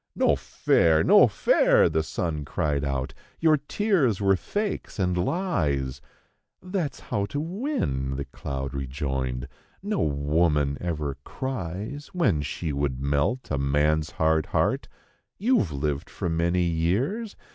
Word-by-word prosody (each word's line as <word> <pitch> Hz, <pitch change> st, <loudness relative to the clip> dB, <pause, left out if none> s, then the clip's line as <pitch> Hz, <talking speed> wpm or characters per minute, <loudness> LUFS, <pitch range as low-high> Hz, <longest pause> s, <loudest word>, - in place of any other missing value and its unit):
"No -, -, +3 dB
fair; 80 Hz, -1 st, +2 dB
no -, -, +7 dB
fair!" -, -, +4 dB
the 80 Hz, -1 st, +1 dB
sun 80 Hz, -2 st, -3 dB
cried 70 Hz, 0 st, -1 dB
out; 70 Hz, -2 st, -2 dB, 0.3 s
"your 160 Hz, -2 st, +4 dB
tears 145 Hz, -, +1 dB
were 95 Hz, -1 st, +4 dB
fakes 205 Hz, -, -3 dB
and 90 Hz, -3 st, +1 dB
lies; 75 Hz, -, -1 dB, 0.6 s
"That's 180 Hz, -, -3 dB
how 100 Hz, +1 st, -2 dB
to 145 Hz, -, -3 dB
win," 160 Hz, -, -2 dB
the 70 Hz, 0 st, -3 dB
cloud 70 Hz, 0 st, -5 dB
rejoined, 65 Hz, -2 st, -3 dB, 0.4 s
"No 205 Hz, -1 st, -1 dB
woman 75 Hz, 0 st, +1 dB
ever 75 Hz, -5 st, -3 dB
cries 115 Hz, -, -5 dB
When 105 Hz, -, +2 dB
she 75 Hz, +2 st, -3 dB
would 70 Hz, -2 st, -1 dB
melt 70 Hz, -, 0 dB
a 70 Hz, -, 0 dB
man's 75 Hz, +3 st, +2 dB
hard 80 Hz, -1 st, +1 dB
heart; -, -, 0 dB, 0.5 s
you've 205 Hz, -, +2 dB
lived 70 Hz, 0 st, -2 dB
for 85 Hz, -, -3 dB
many 85 Hz, +2 st, +1 dB
years. 100 Hz, -, 0 dB
80 Hz, 130 wpm, -26 LUFS, -, 0.6 s, no